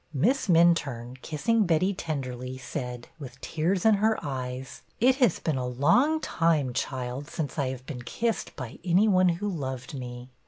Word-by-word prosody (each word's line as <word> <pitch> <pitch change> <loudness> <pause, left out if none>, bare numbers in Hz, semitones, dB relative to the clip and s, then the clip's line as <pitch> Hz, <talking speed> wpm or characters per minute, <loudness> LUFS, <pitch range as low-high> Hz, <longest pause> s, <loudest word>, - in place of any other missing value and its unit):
Miss 225 - +2
Minturne, 150 -9 +3
kissing 215 +7 +1
Betty 175 +4 +2
tenderly, 130 -7 -4
said, 125 -2 -6
with 135 -3 -9
tears 175 +5 -1
in 220 - +7
her 220 0 +3
eyes: 130 -1 -5 0.2
It 255 +3 +4
has 245 - +3
been 155 -4 -1
a 125 - -2
long 170 - +3
time, 160 - +1
child, 130 +2 -3
since 155 -1 -4
I 140 - +1
have 130 -1 -7
been 130 -3 -6
kissed 225 - -2
by 125 -4 -7
any 185 +4 +4
one 185 -3 +5
who 175 +5 -1
loved 130 -9 -4
me." 125 -1 -7
150 Hz, 165 wpm, -27 LUFS, 130-185 Hz, 0.2 s, in